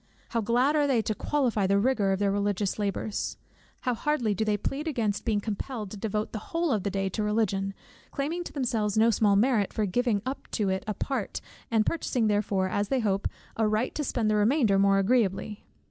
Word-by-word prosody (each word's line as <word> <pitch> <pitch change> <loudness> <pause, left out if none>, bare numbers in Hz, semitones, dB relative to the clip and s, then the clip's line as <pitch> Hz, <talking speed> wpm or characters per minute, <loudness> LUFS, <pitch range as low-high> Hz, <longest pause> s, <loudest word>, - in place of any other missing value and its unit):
How 230 - 0
glad 245 +7 +2
are 295 -1 +3
they 245 -5 +2
to 215 - -1
qualify 235 -5 0
the 200 +1 +3
rigor 210 -3 +2
of 190 - +1
their 200 0 +1
religious 205 0 -1
labours! 205 +1 -2 0.4
How 250 - 0
hardly 240 -3 0
do 200 - -1
they 210 -1 +1
plead 275 +9 -3
against 225 -9 -1
being 215 -3 +2
compelled 215 0 -4
to - - -6
devote 210 0 -2
the 215 - -4
whole 335 +7 -1
of 215 - +1
the 200 - -1
day 195 0 -1
to 200 - -3
Religion, 200 -2 0 0.3
claiming 315 +5 -2
to - - -7
themselves 225 -7 -1
no 225 +1 +5
small 210 -2 +3
merit 215 -1 +2
for 215 - 0
giving 215 +1 0
up 265 +2 -5
to 205 -4 +1
it 190 0 -1
a 210 - -2
part, 260 -7 -3 0.3
and 220 -2 +2
purchasing 255 -7 0
therefore, 205 -2 +1
as 205 +2 -1
they 260 +3 +1
hope, 195 -2 0 0.3
a 220 -1 +2
right 215 +4 0
to 300 - -2
spend 240 -5 -1
the 215 - +2
remainder 210 -1 +3
more 195 0 +4
agreeably! 205 -1 +1
215 Hz, 210 wpm, -28 LUFS, 200-245 Hz, 0.4 s, no